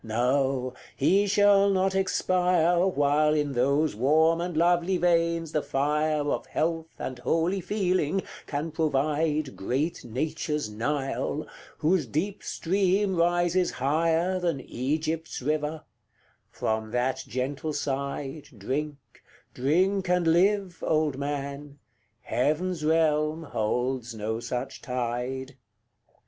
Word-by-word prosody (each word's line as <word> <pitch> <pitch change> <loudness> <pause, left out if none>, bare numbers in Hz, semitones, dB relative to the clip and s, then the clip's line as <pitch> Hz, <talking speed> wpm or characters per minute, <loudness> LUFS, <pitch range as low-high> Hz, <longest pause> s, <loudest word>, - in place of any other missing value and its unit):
No; 125 +3 0 0.2
he 195 +9 +3
shall 200 0 +5
not 190 0 +2
expire 180 -2 +2
While 150 -2 +2
in 145 -2 0
those 140 +3 +1
warm 160 +7 +3
and 175 -2 -3
lovely 175 +2 +3
veins 170 -2 +1
the 150 - +1
fire 150 +2 0
Of - - -2
health 165 0 -1
and 130 -1 -5
holy 165 +9 0
feeling 185 -2 0 0.2
can 150 +3 -3
provide 150 -1 0
Great 135 - -2
Nature's 150 +1 -2
Nile, 140 +5 -2 0.3
whose 155 -2 +1
deep 185 - -2
stream 195 +2 +1
rises 175 +1 +2
higher 165 +6 +1
Than 170 -6 -1
Egypt's 155 +6 -2
river: 150 +3 -2 0.7
from 110 0 -2
that 125 +3 -1
gentle 135 +6 -3
side 140 0 -3
Drink, 140 +8 -3 0.6
drink 185 +8 +1
and 180 -1 +2
live, 185 +2 +2
old 155 -3 +1
man! 140 0 -4 0.4
heaven's 155 +6 -1
realm 155 0 +2
holds 120 -1 -2
no 110 +1 -3
such 120 +1 -4
tide. 125 +2 -3
155 Hz, 110 wpm, -27 LUFS, 135-175 Hz, 0.7 s, shall